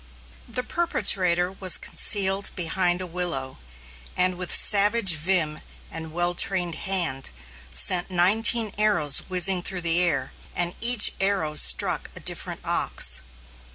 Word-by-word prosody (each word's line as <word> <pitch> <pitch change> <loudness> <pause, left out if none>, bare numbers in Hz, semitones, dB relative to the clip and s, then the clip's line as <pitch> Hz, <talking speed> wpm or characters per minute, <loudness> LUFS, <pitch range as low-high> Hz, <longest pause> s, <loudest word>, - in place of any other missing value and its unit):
The 250 +2 -5
perpetrator 180 - -1
was 190 -2 +2
concealed 195 -1 0
behind 175 +1 -1
a - - -2
willow, 165 - -5 0.6
and 185 0 +1
with 180 0 -6
savage 205 -2 +4
vim 160 -1 0 0.3
and 160 0 -8
well 175 +2 -3
trained 175 -1 +1
hand, 170 -7 -2 0.4
sent 175 - +2
nineteen 210 +4 +1
arrows 170 -10 +1
whizzing 185 0 +2
through 180 0 -6
the 170 0 +2
air, 140 -7 -1 0.2
and 175 0 -1
each 235 -2 +5
arrow 195 -6 -1
struck - - +2
a - - -6
different - - -5
ox. 65 - +1
180 Hz, 125 wpm, -23 LUFS, 170-195 Hz, 0.6 s, each